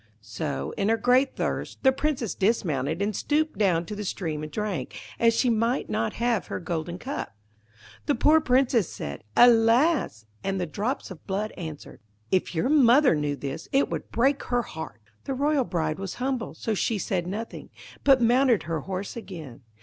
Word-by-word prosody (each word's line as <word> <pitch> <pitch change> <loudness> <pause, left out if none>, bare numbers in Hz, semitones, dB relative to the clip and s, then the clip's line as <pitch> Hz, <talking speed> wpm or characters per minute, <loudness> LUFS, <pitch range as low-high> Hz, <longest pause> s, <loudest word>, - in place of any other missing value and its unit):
So, 105 -10 -4
in 200 +1 +1
her 225 - +3
great 255 +3 +3
thirst, - - -3
the 265 - +6
Princess 265 -5 -1
dismounted 170 - 0
and 205 0 -1
stooped 310 +4 0
down 175 -5 +2
to 210 - -6
the 210 - -5
stream 160 -6 -3
and 155 0 -6
drank, 210 -4 -3 0.2
as 230 -1 +4
she 250 - +2
might 230 +2 +1
not 115 - -1
have 235 -2 0
her - - -4
golden 170 0 -4
cup. 245 - -5 0.7
The 290 - +3
poor 315 +1 +5
Princess 250 - +2
said, 70 0 -6
'Alas!' 235 - +4 0.2
and 195 0 -1
the 180 - 0
drops 205 - -3
of 180 - -12
blood 205 +3 -2
answered, 160 -4 -8 0.3
'If 185 -1 +1
your 165 - +1
mother 275 - +5
knew 150 -2 -1
this, 140 +3 -6
it 275 +1 +2
would - - -4
break 270 +5 +2
her 245 -1 0
heart.' - - -8 0.2
The 270 - -2
royal 285 0 +1
bride 160 -4 -2
was 195 -2 -5
humble, 255 -2 -3
so 225 - -2
she 215 +2 0
said 180 -3 -2
nothing, 215 +5 -6 0.3
but 270 -2 +6
mounted 245 -1 +3
her 165 -1 -2
horse 195 +2 -5
again. 160 - -9
215 Hz, 180 wpm, -26 LUFS, 170-255 Hz, 0.7 s, the